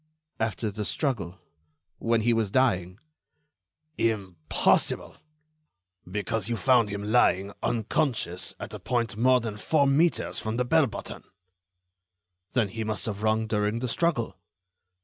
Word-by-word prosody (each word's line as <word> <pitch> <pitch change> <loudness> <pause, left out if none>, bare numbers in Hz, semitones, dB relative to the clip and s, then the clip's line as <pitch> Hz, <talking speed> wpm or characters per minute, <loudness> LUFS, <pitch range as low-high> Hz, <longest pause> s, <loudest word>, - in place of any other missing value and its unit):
"After 110 0 -1
the 105 +1 -4
struggle... 100 - -2 0.6
when 115 0 +1
he 120 +2 +3
was 115 -3 +1
dying." 95 -7 +1 1.0
"Impossible; 95 -8 +1 0.9
because 105 +2 -2
you 115 - -1
found 120 0 +4
him 100 0 -4
lying, 100 -4 +3
unconscious, 115 - -1
at - - -7
a - - -6
point 120 -2 -1
more 125 +3 +4
than 110 -3 -5
four 140 +9 +2
metres 150 +5 +2
from 110 +1 -3
the 125 - +1
bell 150 +3 +4
button." 110 - -7 1.3
"Then 115 -5 +2
he 115 +3 -4
must 110 -1 -1
have 105 -2 -3
rung 110 0 +1
during 105 0 0
the 125 +2 -2
struggle." 120 - 0
110 Hz, 130 wpm, -27 LUFS, 105-120 Hz, 1.3 s, found